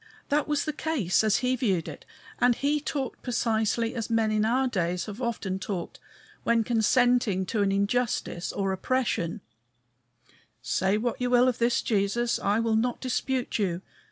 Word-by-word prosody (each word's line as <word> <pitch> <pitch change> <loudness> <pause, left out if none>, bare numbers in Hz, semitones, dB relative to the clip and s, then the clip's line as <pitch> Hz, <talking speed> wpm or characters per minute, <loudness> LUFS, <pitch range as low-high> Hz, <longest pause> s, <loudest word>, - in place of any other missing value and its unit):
That 295 +1 +1
was 295 -1 0
the 305 - -2
case 275 - 0
as 215 -1 +3
he 255 +1 +2
viewed 195 -9 0
it, - - -9 0.3
and 245 -1 +4
he 290 +3 0
talked 275 -4 -4
precisely 230 -1 0
as 230 -2 -4
men 225 -1 +2
in 215 0 +2
our 255 +4 +2
days 180 -5 -1
have 215 +3 -8
often 215 -6 -2
talked 185 -3 -5 0.4
when 235 -1 +2
consenting 230 -3 +2
to 210 +3 -1
an 200 -1 +2
injustice 200 -3 -1
or 195 -1 -1
oppression: 205 -2 -1 1.2
Say 190 +3 +1
what 240 +2 -2
you 250 - +1
will 245 0 +5
of 250 - 0
this 235 +1 +2
Jesus; 225 +3 0
I 205 +2 +1
will 230 -1 +1
not 240 +2 0
dispute 255 -1 -2
you. 185 -3 -1
230 Hz, 165 wpm, -27 LUFS, 200-250 Hz, 1.2 s, will